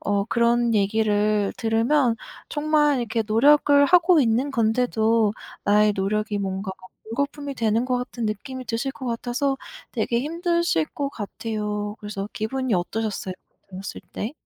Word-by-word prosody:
어, 200 -1 0
그런 235 0 +2
얘기를 210 0 +2
들으면 230 +3 +2 0.3
정말 295 -1 +2
이렇게 230 -1 -1
노력을 285 +5 +5
하고 350 0 +5
있는 245 +3 +1
건데도 225 -2 +2 0.3
나의 210 +1 +4
노력이 210 +2 -1
뭔가 190 0 -3 0.3
물거품이 280 +4 -3
되는 225 0 +1
것 255 -1 +1
같은 245 -2 -5
느낌이 255 +5 -5
드실 235 +4 -2
것 260 - -8
같아서 245 +4 -1 0.4
되게 235 0 0
힘드실 340 - 0
것 280 -1 -3
같아요. 210 -1 -4
그래서 205 -1 -5
기분이 255 +3 -2
어떠셨어요? 195 +1 -2 0.4
들었을 190 +1 -7
때? 220 - -4
230 Hz, 305 characters per minute, -24 LUFS, 210-270 Hz, 0.4 s, 노력을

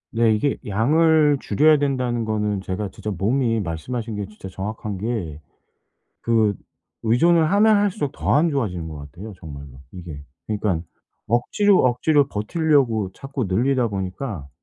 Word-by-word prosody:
네. 115 -1 +3
이게 135 +6 0
양을 150 +7 +3
줄여야 155 +2 +4
된다는 125 -5 -1
거는 105 -2 -1
제가 95 +1 -4
진짜 105 +3 -6
몸이, 115 +4 0
말씀하신 110 +7 -4
게 105 - -3
진짜 100 -1 -11
정확한 100 +2 -5
게, 95 -8 -3 0.8
그 110 -3 +2 0.5
의존을 160 +8 +3
하면 210 +2 +5
할수록 190 -9 0
더 - - 0
안 155 +4 +4
좋아지는 95 - -2
것 80 - -8
같아요 85 +10 -9
정말로 70 -5 -10
이게. 85 -6 -9 0.2
그러니깐 100 -6 -1 0.4
억지로, 180 - +3
억지로 140 +3 +3
버티려고 120 - +1
자꾸 135 +3 -5
늘리다 120 +6 +1
보니까 95 - -5
110 Hz, 310 characters per minute, -22 LUFS, 95-140 Hz, 0.8 s, 하면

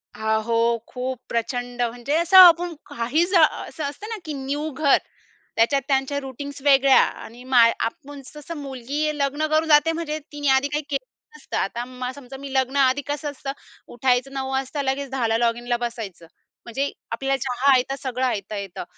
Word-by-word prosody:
अहो, 225 +2 +1
खूप 255 0 -4
प्रचंड 245 +1 -3
म्हणजे 240 +4 -1
असं 340 +3 +4
आपण 350 -1 +8
काही 245 +8 0
जा, 350 -3 +4 0.2
असं 315 - -7
असतं 290 +9 -5
ना 450 - -4
की 310 - -4
न्यू 285 +3 -3
घर 285 0 +3 0.6
त्याच्यात 275 +5 +3
त्यांच्या 270 +1 0
रूटीन्स 280 +1 -8
वेगळ्या 275 -1 +6
आणि 240 +2 -7
मा, 255 -2 +4 0.2
आपण 280 +5 -5
तसं 300 +2 -8
मुलगी 285 +2 -3
लग्न 290 +2 0
करून 315 +1 +2
जाते 295 +2 +5
म्हणजे 320 -2 -3
तिने 290 -1 -4
आधी 275 +2 +2
काही 295 +2 -2
केलं 275 -2 -2 0.3
नसतं, 300 - -6
आता 250 +5 -3
समजा 270 -1 -10
मी 275 0 -8
लग्न 265 +1 +1
आधी 270 0 +3
कसं 290 0 -3
असतं, 275 0 -6 0.4
उठायचं 250 +2 0
9 265 -1 -3
वाजता 270 +2 -2
लगेच, 270 +1 -2
10 230 -4 0
लॉगिनला 240 +1 0
बसायचं. 225 -8 -6 0.4
म्हणजे 270 +4 -2 0.2
आपल्याला 270 +3 -1
चहा 260 +2 +2
आयता, 260 +1 +1
सगळं 260 -1 -1
आयता 210 -4 -2
येतं. 195 -3 -6
270 Hz, 170 wpm, -23 LUFS, 245-290 Hz, 0.6 s, आपण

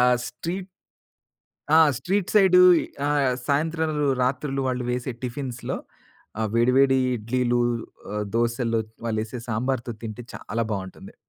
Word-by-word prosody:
ఆహ్, 125 0 +5
స్ట్రీట్ 175 +9 -5 1.1
ఆ! - - +8 0.2
Street 190 +8 -1
side 190 -3 +7 0.5
ఆ! - - +1 0.4
సాయంత్రంలు, 155 +1 0 0.2
రాత్రులు 135 +2 -1
వాళ్ళు 125 -1 -1
వేసే 125 +1 -2
టిఫిన్స్ 125 0 -4
లో - - -1 0.6
ఆహ్, 110 -1 0
వేడి, 120 +2 +3
వేడి 135 -1 +5 0.2
ఇడ్లీలు, 120 +2 0 0.5
ఆహ్, 105 0 -2
దోసల్లో 115 0 +1 0.3
వాళ్ళేసే 110 +1 -2
సాంబార్‌తో 120 +2 -1
తింటే 115 +2 -6
చాలా 115 +1 -3
బావుంటుంది. 95 -2 -7
125 Hz, 120 wpm, -24 LUFS, 115-140 Hz, 1.1 s, ఆ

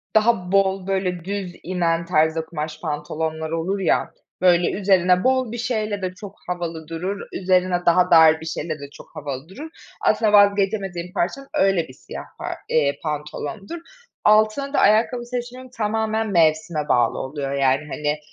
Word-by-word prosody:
daha 215 -5 +2
bol 195 -1 +2
böyle 185 -3 -1
düz 195 -2 -4
inen 170 -2 0
tarzda 160 -1 +1
kumaş 155 -1 -6
pantolonlar 160 0 -3
olur 180 +5 -1
ya, 185 - +1 0.3
böyle 175 -1 +4
üzerine 185 -2 +3
bol 260 -3 +2
bir 240 - -5
şeyle 215 -4 -2
de 185 0 -3
çok 200 +1 -10
havalı 170 -3 -4
durur, 180 +5 -4
üzerine 180 -1 +1
daha 175 +1 +4
dar 160 -1 +7
bir - - -8
şeyle 155 -1 -4
de 140 0 -9
çok - - -14
havalı 140 +2 -6
durur. 300 +11 -9 0.3
Aslında 215 -3 +2
vazgeçemediğim 195 -3 +2
parça 190 +11 -1
öyle 195 -4 +2
bir 130 - -13
siyah - - -9 0.2
pa - - -4
eee, 140 -2 +1
pantolondur. 155 - -5 0.4
Altına 215 +7 +3
da - - +2
ayakkabı 230 +4 +3
seçimim 250 +1 -6
tamamen 220 0 -1
mevsime 155 -2 +2
bağlı 120 -2 +2
oluyor, 135 0 -4
yani, 135 0 +2
hani 150 0 -2
180 Hz, 155 wpm, -22 LUFS, 160-205 Hz, 0.4 s, dar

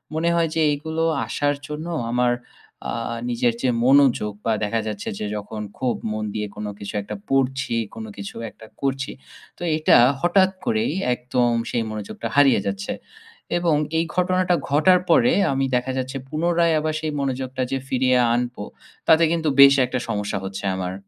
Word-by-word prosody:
মনে 165 +2 +1
হয় 165 -1 +2
যে 165 - +2
এগুলো 160 +2 -3 0.2
আসার 145 0 0
জন্য 150 +2 -5 0.2
আমার 125 0 +2 0.6
আ - - -2 0.4
নিজের 120 0 +1
যে 130 - +2 0.2
মনোযোগ 130 -6 +4
বা 115 - +2
দেখা 115 +2 0
যাচ্ছে 105 -2 -4
যে - - -3
যখন 105 +1 -6 0.2
খুব 125 -2 0 0.2
মন 110 0 -3
দিয়ে 105 -1 -2
কোনো 105 0 -5
কিছু 100 - -7
একটা 105 +1 -7
পড়ছি, 130 -2 0 0.2
কোন 110 0 -6
কিছু 100 0 -7
একটা 110 - -15 0.2
করছি। 135 0 -1 0.5
তো - - -18
এইটা 155 0 +5 0.2
হঠাৎ 185 +2 +4 0.2
করেই 230 +1 0 0.2
একদম 125 0 0 0.2
সেই 115 - 0
মনোযোগটা 110 +1 -5
হারিয়ে 145 -5 +5
যাচ্ছে 100 0 -3 0.6
এবং 170 -3 +2 0.2
এই 165 - +1
ঘটনাটা 185 0 +2
ঘটার 180 +6 +5
পরে 240 +9 +5 0.2
আমি 135 0 +1
দেখা 125 +1 0
যাচ্ছে 130 +1 -3
পুনরায় 170 +2 +2
আবার 155 0 -1
সেই 155 -1 -2
মনোযোগটা 130 -1 -3
যে 135 - 0
ফিরিয়ে 130 0 +2 0.2
আনবো 120 -2 -2 0.4
তাতে 160 0 +6
কিন্তু 165 -2 +1
বেশ 140 0 +9
একটা 125 +1 -3
সমস্যা 105 -1 -2
হচ্ছে 95 0 -5
আমার। 90 -1 -3
130 Hz, 165 wpm, -22 LUFS, 115-160 Hz, 0.6 s, বেশ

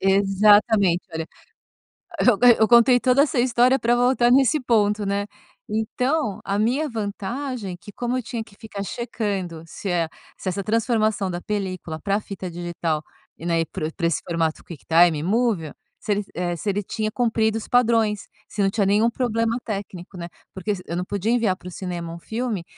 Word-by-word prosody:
Exatamente. 195 -1 +4
Olha, 160 0 -3 0.9
eu 240 -5 +4 0.2
eu 220 - +5
contei 240 +1 +6
toda 255 +2 +4
essa 285 -3 0
história 245 +2 +4
para 240 -1 +2
voltar 245 0 +3
nesse 270 +3 +4
ponto, 210 -4 +2
né. 200 +1 -1 0.4
Então 220 +3 -1
a 200 +1 -1
minha 255 +8 +1
vantagem 220 -1 -4
que 200 +3 -13
como 245 +3 -2
eu - - -3
tinha 235 -1 -4
que 200 -2 -17
ficar 205 -3 -7
checando 200 -7 -4
se 195 - -7
e 170 -3 +1 0.3
se 190 - -5
essa 195 +2 -2
transformação 215 -2 +1
da 175 - -4
película 185 -6 -4
para 200 +5 0
a - - -1
fita 190 -3 -7
digital 170 -2 -3 0.4
e, 165 - -7
né, 165 -1 +2
para 155 - -4
o 160 - -5
para 170 - -1
esse 170 - 0
formato, 165 -2 -1
QuickTime 165 -1 +2
Movie, 200 -4 0 0.3
se 215 - -1
el 205 0 0
eh, 175 -1 -2
se 205 - -5
ele 200 +1 -1
tinha 215 +2 -3
cumprido 225 -2 +1
os 220 - -9
padrões. 225 -4 +2 0.2
Se 205 - -2
não 195 - +3
tinha 205 0 +1
nenhum 210 +4 +3
problema 230 -1 0
técnico, 195 -4 -6
né. 170 - -6 0.2
Porque 200 +2 -2
se 180 - -8
eu 170 - -4
não 180 - -1
podia 205 +3 -2
enviar 230 -6 +2
para 180 - -11
o - - -7
cinema 175 -2 -5
um 170 - -7
filme, 220 -2 -3
205 Hz, 185 wpm, -23 LUFS, 180-235 Hz, 0.9 s, contei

